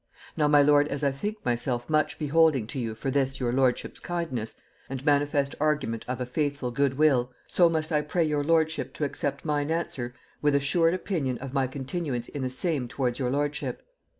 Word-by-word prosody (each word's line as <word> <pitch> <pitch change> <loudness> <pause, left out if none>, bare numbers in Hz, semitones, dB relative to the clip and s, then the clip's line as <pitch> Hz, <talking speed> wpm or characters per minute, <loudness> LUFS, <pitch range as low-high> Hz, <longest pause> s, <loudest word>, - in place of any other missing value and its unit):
Now, 150 - +2
my 145 -1 +6
lord, 145 0 +5
as 145 0 -4
I 140 - +3
think 210 +10 -5
myself 120 0 -1
much 155 -1 +1
beholding 155 -4 +3
to 130 +5 -5
you 115 -3 -3
for 135 +4 -3
this 135 -1 0
your 120 -2 0
lordship's 130 -1 +1
kindness, 150 -11 -3 0.3
and 135 0 -5
manifest 145 -1 +2
argument 145 -7 0
of 125 +1 -3
a 125 - -1
faithful 140 -1 -2
good 135 +1 +1
will, 135 -5 +3
so 175 -2 +4
must 160 0 -1
I 150 -1 +3
pray 165 +3 0
your 150 -2 0
lordship 160 0 +1
to - - -3
accept 140 0 -2
mine 145 -1 0
answer, 130 -7 -2 0.3
with 145 -1 +3
assured 165 +5 +3
opinion 155 -10 -2
of 135 +1 -7
my 135 -2 +2
continuance 135 -1 -4
in 145 - -5
the 130 - -1
same 135 0 -1
towards 125 -1 -2
your 125 -2 0
lordship. 145 +2 -2
140 Hz, 195 wpm, -27 LUFS, 130-155 Hz, 0.3 s, my